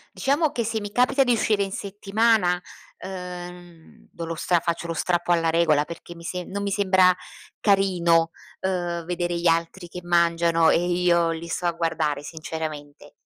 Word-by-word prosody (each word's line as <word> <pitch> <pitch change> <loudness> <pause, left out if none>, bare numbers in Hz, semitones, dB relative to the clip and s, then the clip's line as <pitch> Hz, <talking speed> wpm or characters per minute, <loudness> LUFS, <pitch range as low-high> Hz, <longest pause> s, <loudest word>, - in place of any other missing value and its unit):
Diciamo 290 +3 +1
che 235 - -2
se 220 0 -2
mi 205 -1 -6
capita 250 +5 +3
di 245 -2 +2
uscire 215 -2 +1
in 195 - -5
settimana, 200 -2 +1 0.4
ehm, 180 -2 -9
do 170 - -6
lo 165 0 -4
stra 175 +2 +1
faccio 170 +1 -2
lo 165 - -3
strappo 175 +1 0
alla 165 -1 +3
regola, 160 -3 +3
perché 170 +2 -9
mi 170 - -13
sem 180 +1 -5
non 200 +1 -3
mi 200 - -1
sembra 190 -2 +4 0.5
carino, 175 -5 +3 0.3
uhm, 175 -3 -2
vedere 175 0 -2
gli 170 - +1
altri 165 +2 0
che 180 +1 -8
mangiano 170 -1 +3
e - - +4
io 175 -1 +2
li 165 +1 -5
sto 175 - -3
a 175 - +3
guardare 160 -3 -1
sinceramente. 155 -2 -7
175 Hz, 170 wpm, -24 LUFS, 165-190 Hz, 0.5 s, sembra